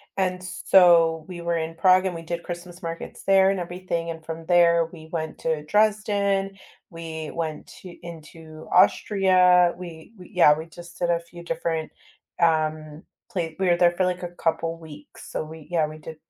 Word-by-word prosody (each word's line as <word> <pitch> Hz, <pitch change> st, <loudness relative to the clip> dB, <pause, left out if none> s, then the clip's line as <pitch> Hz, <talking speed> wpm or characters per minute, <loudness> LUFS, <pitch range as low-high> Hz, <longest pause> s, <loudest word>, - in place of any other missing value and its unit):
and 185 Hz, -1 st, -1 dB
so 170 Hz, -3 st, +4 dB
we 175 Hz, -2 st, -8 dB
were 170 Hz, 0 st, -1 dB
in 165 Hz, 0 st, -4 dB
Prague 185 Hz, +2 st, +4 dB
and 180 Hz, -2 st, -2 dB
we 165 Hz, -, -6 dB
did 170 Hz, +1 st, -5 dB
Christmas 175 Hz, +1 st, -8 dB
markets 165 Hz, 0 st, -7 dB
there 195 Hz, 0 st, +5 dB
and 195 Hz, -1 st, 0 dB
everything, 175 Hz, -1 st, -4 dB
and 160 Hz, -1 st, -7 dB
from 165 Hz, 0 st, -7 dB
there 170 Hz, -1 st, +4 dB
we 160 Hz, -1 st, -12 dB
went 160 Hz, -2 st, -4 dB
to 155 Hz, -2 st, -2 dB
Dresden, 205 Hz, -1 st, +1 dB, 0.4 s
we 160 Hz, -2 st, -7 dB
went 160 Hz, -2 st, -4 dB
t 180 Hz, -2 st, -13 dB
into 160 Hz, -1 st, -11 dB
Austria, 180 Hz, -2 st, +4 dB
we 170 Hz, +2 st, -10 dB
we 180 Hz, -, -14 dB
yeah, 150 Hz, -4 st, +5 dB
we 160 Hz, -, -6 dB
just 175 Hz, +2 st, -13 dB
did 175 Hz, -, -1 dB
a 170 Hz, -1 st, +2 dB
few 170 Hz, 0 st, -13 dB
different, 165 Hz, -1 st, -3 dB, 0.5 s
um, 155 Hz, -1 st, 0 dB, 0.3 s
pla 180 Hz, -, -2 dB, 0.2 s
we 190 Hz, -, +1 dB
were 175 Hz, -, +4 dB
there 175 Hz, 0 st, +4 dB
for, 185 Hz, +2 st, 0 dB
like, 180 Hz, 0 st, -2 dB
a 175 Hz, -, -4 dB
couple 165 Hz, -1 st, -2 dB
weeks, 150 Hz, -2 st, -13 dB
so -, -, -3 dB
we 155 Hz, -1 st, -11 dB
yeah, 165 Hz, -3 st, +1 dB
we 155 Hz, +1 st, -10 dB
did 160 Hz, +1 st, -10 dB
170 Hz, 185 wpm, -24 LUFS, 160-180 Hz, 0.5 s, there